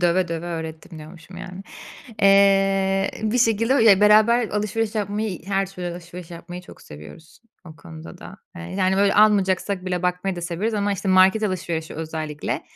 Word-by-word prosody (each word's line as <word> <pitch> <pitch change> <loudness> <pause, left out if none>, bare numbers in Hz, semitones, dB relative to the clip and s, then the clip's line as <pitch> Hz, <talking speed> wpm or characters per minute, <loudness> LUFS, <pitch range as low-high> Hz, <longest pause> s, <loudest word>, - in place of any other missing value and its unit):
"döve 175 +1 +1
döve 170 +1 -5
öğrettim" 160 -1 -7
diyormuşum 165 +3 -13
yani. 185 0 -9 0.6
Eee, 195 -1 +3
bir 220 +3 0
şekilde 230 +1 +2
Ya, 205 -3 +6
beraber 215 +3 +4
alışveriş 210 +1 -2
yapmayı, 205 -2 -3
her 195 -1 0
türlü 180 -2 -8
alışveriş 175 0 -10
yapmayı 175 +1 -9
çok - - -15
seviyoruz 75 - -14 0.3
o 160 -3 -13
konuda 160 +3 -12
da. 195 - -11 0.2
Eee, 170 - -8 0.2
yani, 190 0 +1
böyle, 200 0 +2
almayacaksak 200 -2 +2
bile 180 -1 -3
bakmayı 180 +1 -2
da - - -5
severiz 175 +6 -3
ama 205 0 0
işte, 195 0 -4
market 190 +3 +4
alışverişi 170 -5 -3
özellikle 155 -1 -5
185 Hz, 160 wpm, -22 LUFS, 170-205 Hz, 0.6 s, Ya